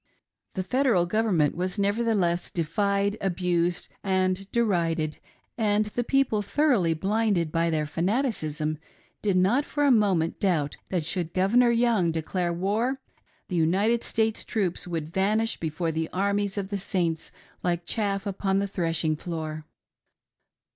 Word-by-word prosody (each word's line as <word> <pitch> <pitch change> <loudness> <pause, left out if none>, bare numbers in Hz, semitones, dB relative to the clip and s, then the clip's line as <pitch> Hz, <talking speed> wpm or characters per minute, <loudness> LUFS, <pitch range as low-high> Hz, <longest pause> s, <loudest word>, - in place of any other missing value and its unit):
The 190 - -1
Federal 245 -5 +2
Government 180 -6 +1
was 180 +3 -2
nevertheless 200 -4 +1
defied, 200 +5 0
abused, 175 -1 0 0.2
and 190 0 0
derided, 170 -9 0 0.4
and 210 -1 +2
the 225 +3 -2
people, 270 -4 +2
thoroughly 205 - +2
blinded 195 -2 +1
by 165 +1 +1
their 155 -2 0
fanaticism, 160 - -1 0.4
did 200 -3 +1
not 205 +10 +3
for 290 0 -2
a 280 - +5
moihent 195 -8 +2
doubt 160 -7 +1
that 175 -5 -1
should 170 -1 -3
Governor 230 +7 +4
Young 230 -7 +2
"declare 170 +2 -1
war" 210 +10 0 0.5
the 180 - -4
United 195 +8 +2
States 220 -1 0
troops 190 -6 -1
would 165 -2 -4
vanish 215 +4 +1
before 165 +1 -2
the 160 0 -2
"Armies" 200 +1 0
©f 195 -2 -3
the 200 -1 -2
Saints 170 -4 -2 0.3
like 175 -1 -1
chaff 200 -1 -1
upon 195 -1 0
the 200 0 0
threshing 165 -4 0
floor. 155 -1 -5
190 Hz, 135 wpm, -26 LUFS, 170-210 Hz, 0.5 s, a